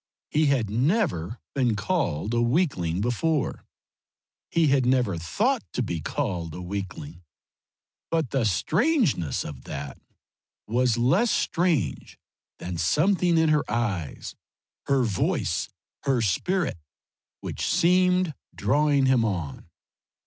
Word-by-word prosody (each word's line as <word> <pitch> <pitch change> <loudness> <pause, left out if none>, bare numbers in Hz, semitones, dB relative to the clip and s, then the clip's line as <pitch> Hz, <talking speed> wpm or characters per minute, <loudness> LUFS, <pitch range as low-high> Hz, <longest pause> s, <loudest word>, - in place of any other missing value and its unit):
He 155 0 +3
had 135 -6 +2
never 120 - 0 0.2
been 125 -5 +1
called 105 - -1
a 120 - +2
weakling 120 - +1
before 135 +6 -1 0.9
he 165 -1 +2
had 135 -1 +3
never 125 -6 +2
thought 220 - 0
to 125 - 0
be 85 -7 -3
called 85 - -3
a - - -6
weakling, 90 -4 -6 0.9
but 160 -6 0
the 135 -3 +1
strangeness 125 - +1
of 70 -3 -8
that 70 -1 -6 0.7
was 120 0 +1
less 170 - +3
strange 165 - 0 0.4
than 90 -2 -5
something 175 - +2
in 160 -1 +4
her 150 -1 +3
eyes, 105 -9 -2 0.5
her 135 -2 +3
voice, 105 -6 -1 0.4
her 135 -3 +2
spirit, 150 - 0 0.6
which - - -5
seemed 180 -1 +3 0.2
drawing 145 -1 +2
him 130 -3 +3
on. 85 -11 -3
125 Hz, 115 wpm, -25 LUFS, -, 0.9 s, in